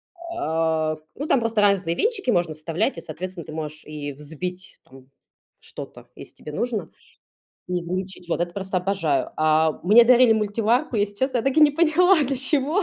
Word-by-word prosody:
А, 160 - -1 0.2
ну, 290 - -5
там 270 - +3
просто 230 -2 0
разные 195 -4 +2
венчики 440 - -1
можно 175 -5 +1
вставлять. 165 - -2
И, - - -6
соответственно, 175 +1 -7
ты - - -9
можешь 155 0 -6
и 150 -1 -6
взбить 160 +6 -7
там 135 0 -16 0.6
что-то, - - -11
если - - -12
тебе 150 - -10
нужно, 230 +7 -3 0.8
и 180 0 0
измельчить. 180 +1 -5
Вот 170 - -1
это 175 0 -2
просто 190 0 -2
обожаю. 175 -8 -1
А, 155 0 +2
мне 215 +6 +7
дарили 245 -1 +6
мультиварку. 220 +3 0
Если 205 -1 0
честно, 260 +2 0
я - - -1
так 270 +3 0
и - - +5
не 300 -1 +7
поняла, 340 +5 +4
для 275 0 -1
чего. 285 +7 +1
195 Hz, 180 wpm, -23 LUFS, 160-255 Hz, 0.8 s, мне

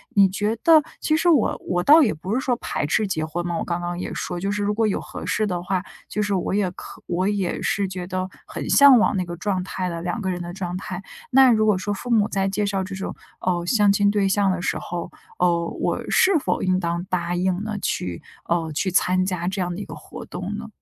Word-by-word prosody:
你 200 -2 +6
觉 205 +4 -1
得 320 -2 +7 0.2
其 310 - +2
实 340 - 0
我 295 -10 +3
我 175 -1 +1
倒 310 - +8
也 225 - +2
不 180 +6 -5
是 - - +2
说 260 -2 0
排 145 - -3
斥 210 +8 +1
结 155 -5 -1
婚 170 +2 -4
嘛， 170 - -2
我 - - -2
刚 175 0 -2
刚 175 0 -3
也 - - -4
说， 175 - -4
就 195 +3 -1
是 205 0 -1
如 205 +1 +1
果 225 0 +2
有 200 - 0
合 - - -8
适 215 - 0
的 175 -2 -2
话， 185 0 -1 0.2
就 210 - -2
是 205 -1 0
我 185 - -1
也 200 -2 +1
可 - - -11
我 180 +2 0
也 200 -3 -1
是 200 -1 0
觉 185 -1 -5
得 185 0 -3 0.2
很 - - -6
向 280 -3 +8
往 210 - +2
那 185 - -1
个 175 0 -6
状 190 -1 -1
态 185 0 -3
的 170 -1 -5
两 195 +6 -2
个 190 - -1
人 180 -1 -2
的 175 0 -6
状 180 -2 -4
态。 185 -1 -6 0.3
那 265 -1 +7
如 215 -1 +3
果 210 -2 +4
说 195 +3 -3
父 245 +5 -7
母 210 -3 +4
在 195 0 0
介 195 +2 -1
绍 195 -1 -1
这 195 +1 -6
种， 190 - -5 0.3
哦， 175 -2 0
相 205 +1 +4
亲 200 0 +3
对 205 -2 +2
象 200 0 +2
的 185 -1 -2
时 - - -1
候， 175 -1 -5 0.3
呃， 170 -1 +2
我 - - -2
是 375 -3 +4
否 - - -1
应 185 0 +2
当 170 -1 -2
答 175 -1 -1
应 185 +1 0
呢？ 215 -1 -3
去 90 -2 -2 0.2
呃， 165 -2 -1
去 175 +6 -1
参 185 0 +2
加 180 -2 -2
这 190 +1 -2
样 175 -1 -2
的 - - -6
一 - - -6
个 - - -9
活 - - -10
动 - - -5
呢？ - - -7
190 Hz, 275 characters per minute, -23 LUFS, 175-205 Hz, 0.3 s, 倒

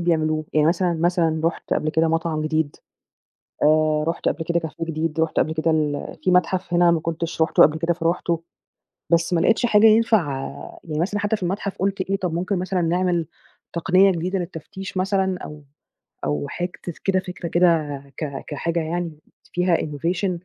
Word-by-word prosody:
بيعملوه؟ 155 -2 +1
يعني 155 -1 +3
مثلًا، 175 +1 +2
مثلًا 165 -1 +1
رُحت 165 - -1
قبل 155 - 0
كده 160 +1 +2
مطعم 165 -1 0
جديد، 155 -1 -1 0.9
آآ 155 0 +3
رُحت 170 - -1
قبل 160 - -2
كده 170 +1 0
كافيه 160 0 -5
جديد، 160 0 -2
رُحت 160 -1 0
قبل 160 - 0
كده 160 +1 +1
ال 150 -2 -1
فيه 185 - +2
مَتحَف 180 0 +1
هنا 175 0 +5
ما 170 - +2
كنتش 165 0 -2
رُحته 160 - +5
قبل 155 +1 +4
كده، 165 +1 +1
فرُحته، 170 0 -1 0.7
بس 170 +1 +2
ما 170 - +3
لقيتش 225 +5 +3
حاجة 215 -1 +5
ينفع 220 -7 +4 0.5
يعني 155 -2 -4
مثلًا 205 +4 -1
حتّى 210 +2 0
في 205 - -15
المَتحَف 195 +2 -2
قُلت 195 0 -1
إيه، 190 +1 0
طَب 180 -3 -3
ممكن 185 +3 -1
مثلًا 185 0 -1
نعمل 175 0 +1 0.5
تقنية 185 +3 +4
جديدة 180 +2 -1
للتفتيش 185 +3 -7
مثلًا 190 0 +1
أو 150 -1 -9 0.6
أو 75 -1 -1
حاجة 175 0 -3
ت - - -5
كده 190 -1 +2
فكرة 180 -1 -6
كده 165 -4 +2 0.2
ك 140 -3 -4
كحاجة 165 +3 -2
يعني 165 -1 -3 0.3
فيها 180 -1 +2
innovation 170 +6 -1
170 Hz, 175 wpm, -22 LUFS, 160-185 Hz, 0.9 s, هنا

